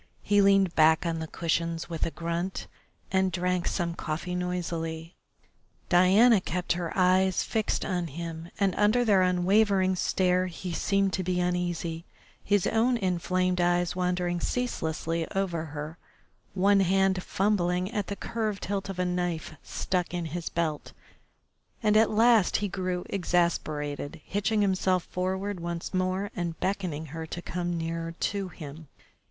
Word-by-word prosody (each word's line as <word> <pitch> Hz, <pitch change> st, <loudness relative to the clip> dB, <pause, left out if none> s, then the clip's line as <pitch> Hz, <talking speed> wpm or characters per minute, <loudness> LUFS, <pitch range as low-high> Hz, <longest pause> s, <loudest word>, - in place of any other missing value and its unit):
He 205 Hz, 0 st, +4 dB
leaned 195 Hz, -3 st, +4 dB
back 160 Hz, +1 st, +4 dB
on 165 Hz, -1 st, -1 dB
the 160 Hz, -, -4 dB
cushions 165 Hz, 0 st, -1 dB
with 165 Hz, -2 st, -2 dB
a -, -, -1 dB
grunt, 170 Hz, +3 st, -3 dB, 0.5 s
and 190 Hz, 0 st, +2 dB
drank 180 Hz, -1 st, 0 dB
some 170 Hz, -2 st, -1 dB
coffee 170 Hz, +2 st, -4 dB
noisily. 170 Hz, -2 st, -3 dB, 0.8 s
Diana 195 Hz, +5 st, +6 dB
kept 180 Hz, 0 st, -1 dB
her 170 Hz, -1 st, -3 dB
eyes 185 Hz, 0 st, +3 dB
fixed 220 Hz, -2 st, -1 dB
on 180 Hz, -3 st, -1 dB
him, 165 Hz, +2 st, -6 dB
and 195 Hz, -2 st, +2 dB
under 215 Hz, +4 st, +3 dB
their 200 Hz, -4 st, +4 dB
unwavering 190 Hz, +1 st, +3 dB
stare 185 Hz, 0 st, +1 dB
he 180 Hz, 0 st, -6 dB
seemed 195 Hz, +1 st, +1 dB
to 185 Hz, -, -1 dB
be 180 Hz, 0 st, 0 dB
uneasy, 175 Hz, -2 st, -1 dB, 0.4 s
his 205 Hz, -2 st, +2 dB
own 240 Hz, +3 st, +2 dB
inflamed 185 Hz, -2 st, 0 dB
eyes 175 Hz, 0 st, +1 dB
wandering 180 Hz, -1 st, 0 dB
ceaselessly 165 Hz, -8 st, -2 dB
over 175 Hz, -4 st, -1 dB
her, 150 Hz, +2 st, -7 dB, 0.6 s
one 200 Hz, +1 st, +4 dB
hand 190 Hz, 0 st, +2 dB
fumbling 185 Hz, -1 st, 0 dB
at 205 Hz, -4 st, -2 dB
the 200 Hz, -, -3 dB
curved 215 Hz, -2 st, -3 dB
hilt 200 Hz, 0 st, -3 dB
of 195 Hz, -, -5 dB
a 180 Hz, -, 0 dB
knife 175 Hz, -3 st, -2 dB
stuck 180 Hz, -1 st, -2 dB
in 175 Hz, -1 st, -2 dB
his 165 Hz, +2 st, -4 dB
belt, 160 Hz, -3 st, -2 dB, 0.9 s
and 210 Hz, -1 st, +3 dB
at 220 Hz, +1 st, +5 dB
last 225 Hz, -2 st, +4 dB
he 205 Hz, -, -1 dB
grew 185 Hz, -2 st, -3 dB
exasperated, 165 Hz, -5 st, -1 dB
hitching 210 Hz, +2 st, 0 dB
himself 185 Hz, -2 st, +1 dB
forward 190 Hz, +1 st, -3 dB
once 170 Hz, +1 st, -4 dB
more 185 Hz, +2 st, -1 dB
and 170 Hz, -2 st, -3 dB
beckoning 180 Hz, -6 st, -2 dB
her 160 Hz, 0 st, -5 dB
to 170 Hz, -, -5 dB
come 175 Hz, 0 st, -3 dB
nearer 165 Hz, 0 st, -3 dB
to 200 Hz, -2 st, -1 dB
him. 155 Hz, -2 st, -10 dB
180 Hz, 145 wpm, -28 LUFS, 170-195 Hz, 0.9 s, Diana